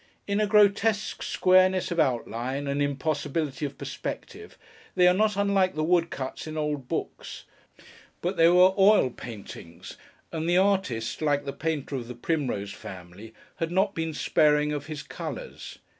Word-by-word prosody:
In 200 Hz, +1 st, -1 dB
a 210 Hz, -, +2 dB
grotesque 210 Hz, +1 st, +2 dB
squareness 185 Hz, 0 st, +3 dB
of 170 Hz, -, -1 dB
outline, 130 Hz, 0 st, -1 dB
and 140 Hz, +1 st, -1 dB
impossibility 145 Hz, 0 st, -2 dB
of 140 Hz, -1 st, -13 dB
perspective, -, -, -7 dB, 0.4 s
they 180 Hz, -1 st, +5 dB
are 180 Hz, -, +6 dB
not 210 Hz, +1 st, +1 dB
unlike 200 Hz, -2 st, +2 dB
the 155 Hz, -, -1 dB
woodcuts 165 Hz, -5 st, -1 dB
in 155 Hz, 0 st, -6 dB
old 150 Hz, -4 st, -2 dB
books; -, -, -5 dB, 0.8 s
but 180 Hz, +3 st, -2 dB
they 165 Hz, -1 st, +5 dB
were 180 Hz, +2 st, +6 dB
oil 195 Hz, -9 st, +5 dB
paintings, 100 Hz, -8 st, -10 dB, 0.3 s
and 160 Hz, +1 st, -2 dB
the 175 Hz, -, +4 dB
artist, 185 Hz, -, 0 dB
like 145 Hz, -2 st, +1 dB
the 140 Hz, -, -4 dB
painter 155 Hz, -3 st, -3 dB
of 120 Hz, -2 st, -6 dB
the 125 Hz, -, -7 dB
Primrose 120 Hz, -8 st, -2 dB
family, 95 Hz, +4 st, -10 dB, 0.3 s
had 165 Hz, 0 st, -2 dB
not 195 Hz, +2 st, +1 dB
been 160 Hz, -1 st, -2 dB
sparing 150 Hz, -1 st, +2 dB
of 145 Hz, 0 st, -5 dB
his 155 Hz, -2 st, -6 dB
colours. -, -, -7 dB
155 Hz, 155 wpm, -26 LUFS, 135-185 Hz, 0.8 s, are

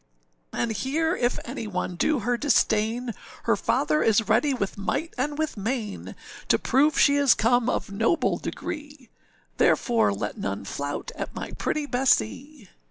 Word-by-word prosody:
âAnd 235 Hz, -, -1 dB
here 320 Hz, -, 0 dB
if 245 Hz, -5 st, 0 dB
any 235 Hz, -2 st, -5 dB
one 180 Hz, -2 st, -3 dB
do 290 Hz, -, +1 dB
her 245 Hz, +3 st, +1 dB
disdain, 235 Hz, -3 st, +1 dB, 0.3 s
Her -, -, +3 dB
father 305 Hz, -, +1 dB
is 220 Hz, -1 st, +3 dB
ready 230 Hz, +7 st, +3 dB
with 205 Hz, -7 st, -2 dB
might 260 Hz, +11 st, -2 dB
and 290 Hz, +3 st, -2 dB
with 310 Hz, -6 st, -2 dB
main 215 Hz, 0 st, -4 dB, 0.3 s
To -, -, +4 dB
prove 295 Hz, +4 st, +2 dB
she 285 Hz, 0 st, +5 dB
is 280 Hz, -3 st, +5 dB
come 245 Hz, +2 st, +2 dB
of 200 Hz, -, -2 dB
noble 225 Hz, -, +1 dB
degree, 290 Hz, -5 st, -7 dB, 0.5 s
Therefore 230 Hz, -, +3 dB
let 100 Hz, -, -4 dB
none 100 Hz, 0 st, -3 dB
flout 145 Hz, +6 st, -4 dB
at -, -, -6 dB
my -, -, -5 dB
pretty 305 Hz, -1 st, -2 dB
Bessee. 260 Hz, -, 0 dB
245 Hz, 155 wpm, -25 LUFS, 210-285 Hz, 0.5 s, she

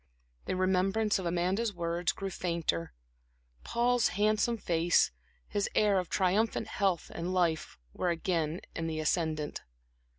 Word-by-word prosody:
The -, -, -1 dB
remembrance 190 Hz, +3 st, +2 dB
of 180 Hz, -, -3 dB
Amanda's 185 Hz, +5 st, 0 dB
words 170 Hz, 0 st, 0 dB
grew 195 Hz, -1 st, -5 dB
fainter; 170 Hz, -, -1 dB, 0.7 s
Paul's 240 Hz, 0 st, +2 dB
handsome 215 Hz, +3 st, +2 dB
face, 170 Hz, -3 st, +2 dB, 0.4 s
his 205 Hz, -, -1 dB
air 205 Hz, -3 st, +4 dB
of 180 Hz, -, -4 dB
triumphant 195 Hz, +4 st, +1 dB
health 190 Hz, -4 st, 0 dB
and 170 Hz, +2 st, -3 dB
life, 170 Hz, -3 st, 0 dB, 0.2 s
were 180 Hz, -, -1 dB
again 170 Hz, -2 st, -1 dB
in 165 Hz, -1 st, -2 dB
the 160 Hz, -1 st, -2 dB
ascendent. 155 Hz, -1 st, -1 dB
180 Hz, 130 wpm, -31 LUFS, 170-205 Hz, 0.7 s, air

